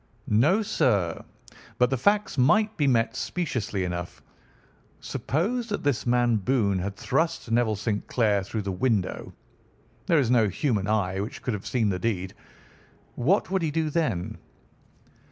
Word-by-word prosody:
"No, 150 - +3
sir, 100 - +1 0.5
but 125 +1 +3
the - - +2
facts 205 - +1
might 210 - +3
be 150 -6 +1
met 115 -3 +2
speciously 120 - -2
enough. 90 -1 -5 0.8
Suppose 225 - -2
that 205 - -3
this 140 -4 0
man 120 -1 +3
Boone 100 -3 +1
had 100 +2 -4
thrust 160 - -1
Neville 115 -2 +2
St. 105 +1 -3
Clair 105 -5 +2
through 105 +2 -4
the 100 - -3
window, 100 -1 -1 0.8
there 170 -4 +4
is 130 -5 +2
no 115 -4 +4
human 100 - -1
eye 95 -3 0
which 115 +8 -5
could 125 - -1
have 105 -1 -5
seen 115 -5 +1
the 90 -2 -1
deed. 95 -4 -2 0.8
What 180 - +1
would 190 -1 +1
he 160 - 0
do 155 0 -1
then? 130 - -1
120 Hz, 155 wpm, -26 LUFS, 100-155 Hz, 0.8 s, there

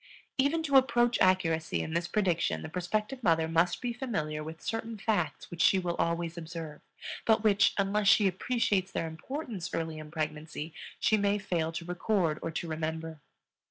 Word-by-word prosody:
Even 300 +5 +2
to 280 -3 +5
approach 240 -2 +3
accuracy 165 -4 +2
in 160 - -5
this 170 0 0
prediction 170 - 0
the - - -6
prospective 210 +9 -2
mother 165 -6 +3
must 165 +5 +1
be 245 -1 -1
familiar 155 - -3
with 160 +1 -8
certain 225 0 -4
facts 195 -8 -1
which 175 -1 -3
she 195 - +6
will 175 -2 -1
always 170 0 -1
observe, 160 -2 -7 0.4
but 220 -1 +3
which, 205 -2 +4
unless 200 +1 +1
she 215 0 +6
appreciates 195 -1 0
their - - -1
importance 190 - -5
early 160 -1 -3
in 155 0 -9
pregnancy, 155 0 -4 0.3
she 215 - +3
may 200 0 +2
fail 170 -5 -1
to 170 +1 -5
record 180 -3 0
or - - -2
to 165 +1 -4
remember. 160 0 -4
175 Hz, 170 wpm, -30 LUFS, 160-215 Hz, 0.4 s, she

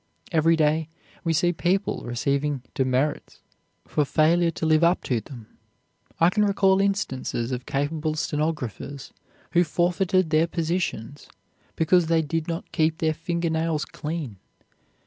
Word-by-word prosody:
Every 165 0 +4
day 155 0 +1 0.3
we 165 - 0
see 175 +2 +2
people 185 +4 0
receiving 140 +3 -1
"demerits" 130 +3 -1 0.5
for 150 - +1
failure 160 +5 +3
to 165 - -4
live 155 +1 +4
up 170 +2 +3
to 120 -4 -1
them. 120 -1 -11 0.7
I 170 +2 +5
can 210 +2 +2
recall 195 -1 +3
instances 135 -11 -1
of 125 0 -4
capable 155 +2 -1
stenographers 150 -4 -3 0.4
who 175 - +4
forfeited 180 +1 +1
their 160 +1 +3
positions 165 -7 -3 0.5
because 165 +1 +3
they 165 -1 +2
did 160 +1 -2
not 165 0 -5
keep 160 -1 +1
their 160 -1 +1
finger 170 +1 -2
nails 160 -1 0
clean. 150 - -5
160 Hz, 135 wpm, -25 LUFS, 145-170 Hz, 0.7 s, I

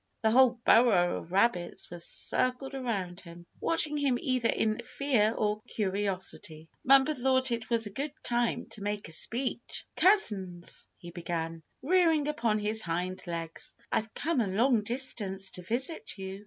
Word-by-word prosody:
The 220 - +3
whole 250 0 +5
burrow 210 -7 +4
of 170 - -13
rabbits 185 -4 0
was 175 -1 -3
circled 255 +2 0
around 200 -9 -3
him, 170 -1 -13
watching 310 -2 +2
him 275 -4 +1
either 255 -3 0
in 220 +1 0
fear 250 -4 +1
or 210 0 0
curiosity. 190 -5 -3 0.2
Bumper 270 +3 +5
thought 260 -1 +2
it 230 -1 -3
was 230 -1 +1
a 205 - -6
good 280 +8 -4
time 240 -1 0
to 210 - -5
make 205 0 -3
a - - -7
speech. 240 +8 -3
"Cousins," 195 - +2
he 175 -2 -11
began, 165 -1 -4 0.2
rearing 325 -2 +3
upon 230 -7 0
his 215 +1 0
hind 180 +1 -3
legs, 165 -1 -4 0.2
"I've 220 0 -1
come 315 -4 0
a 215 - 0
long 225 +4 +2
distance 205 -5 0
to 180 - -6
visit 245 - 0
you. 190 0 -6
220 Hz, 155 wpm, -29 LUFS, 185-260 Hz, 0.2 s, whole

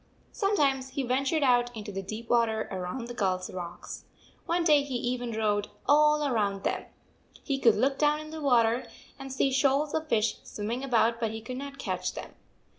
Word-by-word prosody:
Sometimes 280 -10 +1
he 270 +1 -3
ventured 275 +5 +1
out 245 -2 +4
into 210 -1 -6
the 195 0 -4
deep 215 +4 -7
water 230 -2 +2
around 185 +6 -4
the 240 - -6
gulls 185 -5 -1
rocks. 175 -1 -7 0.4
One 340 +1 +1
day 300 -3 +5
he 280 -2 -5
even 245 -1 -2
rowed 210 -2 0 0.2
all 300 0 +4
round 200 -6 0
them. - - -1 0.6
He 275 -2 -1
could 230 -4 +5
look 270 +5 +1
down 300 0 +3
into 310 +1 -8
the - - -6
water 240 -3 +3 0.3
and 270 0 -7
see 265 +1 +1
shoals 275 +2 +2
of 315 0 -1
fish 220 -2 +1
swimming 225 +5 -4
about, 230 -3 +2
but 225 -2 0
he 220 +1 -5
could 250 +3 -7
not 280 0 -7
catch - - -3
them. - - -8
250 Hz, 190 wpm, -28 LUFS, 220-280 Hz, 0.6 s, day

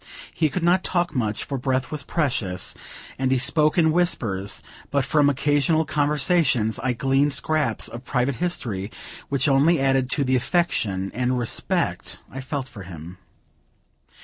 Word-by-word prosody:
He 155 -2 +1
could 175 +4 -3
not 175 +2 +3
talk 175 -2 0
much, 110 -6 -1
for 135 -2 -4
breath 130 0 -1
was 155 -2 -2
precious, 120 - -1 0.5
and 130 -1 +1
he 130 - +3
spoke 150 +5 +2
in 160 -2 +4
whispers; 110 - 0 0.3
but 140 -2 +1
from 145 0 +3
occasional 145 +3 +2
conversations, 145 -6 +1
I 130 0 0
gleaned 135 +4 +2
scraps 155 +2 0
of 120 +2 -8
private 125 0 -1
history 110 - -2 0.4
which 140 +2 +1
only 145 +5 +4
added 135 -1 +2
to 140 - +1
the 130 -1 +1
affection 115 - 0
and 125 +2 0
respect 120 -2 -1
I 135 - -6
felt 135 0 -4
for 110 -6 -11
him. 85 0 -10
135 Hz, 150 wpm, -23 LUFS, 125-150 Hz, 0.5 s, in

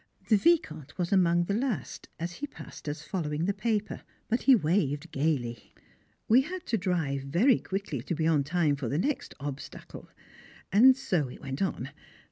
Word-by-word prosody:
The 220 - +6
Vicomte 160 - +1
was 180 +2 -1
among 175 -2 +4
the 200 - -2
last, 230 - -3
as 170 +2 -4
he 290 - -4
passed 155 - -9
us 150 +1 -5
following 155 -2 -2
the 200 - +1
paper, 215 +1 -2 0.3
but 235 +2 +1
he 270 - +7
waved 155 - 0
gaily. 135 -6 -2 0.5
We 240 +4 +6
had 360 +5 -6
to 225 - 0
drive 165 -7 -1
very 205 - +3
quickly 190 - -4
to 155 +7 -3
be 160 0 -1
in 155 -3 +3
time 155 0 +1
for 130 -5 -3
the 140 - -1
next 280 - -2
"obstacles" 145 0 -8 0.6
and 255 +6 +7
so 180 - 0
it 125 - -10
went 135 +1 -5
on. 145 -8 -2
170 Hz, 175 wpm, -29 LUFS, 145-215 Hz, 0.6 s, he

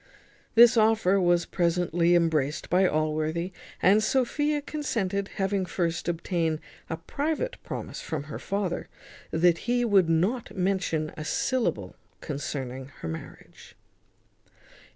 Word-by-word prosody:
This 235 +1 +8
offer 215 -3 +4
was 175 -1 +3
presently 175 0 +2
embraced 155 -4 +1
by 185 +1 +4
Allworthy, 155 +3 -1 0.3
and 200 +4 +6
Sophia 290 +5 +1
consented, 200 -11 -2
having 195 0 0
first 170 -2 -2
obtained 165 -2 -1 0.3
a 160 - -2
private 310 - -2
promise - - -6
from 155 -3 -4
her 155 - -7
father 195 -3 -2 0.4
that 170 +6 +2
he 245 0 +2
would 195 -6 +4
not 190 +9 0
mention 180 -5 0
a 155 - -6
syllable 155 - -1 0.2
concerning 135 -3 -5
her - - -4
marriage. 80 0 -9
175 Hz, 115 wpm, -27 LUFS, 160-215 Hz, 0.4 s, This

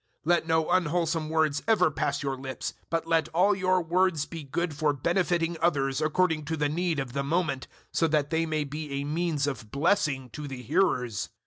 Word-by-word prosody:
004:029 170 - +2
Let 170 -2 +2
no 160 -1 +2
unwholesome 165 -2 +1
words 155 -2 +1
ever 195 -8 +4
pass 140 0 -1
your 135 -1 -1
lips, 130 0 -5 0.2
but 165 -1 -1
let 165 -1 +1
all 195 +4 +5
your 185 -1 +2
words 170 -2 +2
be 165 0 -7
good 155 +4 -2
for 150 0 +1
benefiting 170 +2 0
others 135 -5 +1
according 155 0 +1
to 160 +2 -2
the 145 -1 +1
need 170 +1 0
of 130 -3 -4
the 140 0 -1
moment, 155 -3 -1 0.3
so 165 - +3
that 150 -1 +1
they 165 0 +1
may 155 -1 0
be 150 0 -6
a 140 0 -2
means 155 -1 0
of 130 -7 -4
blessing 140 - +1
to 150 +5 -6
the 130 -2 -7
hearers. 125 - 0
155 Hz, 200 wpm, -28 LUFS, 140-170 Hz, 0.3 s, all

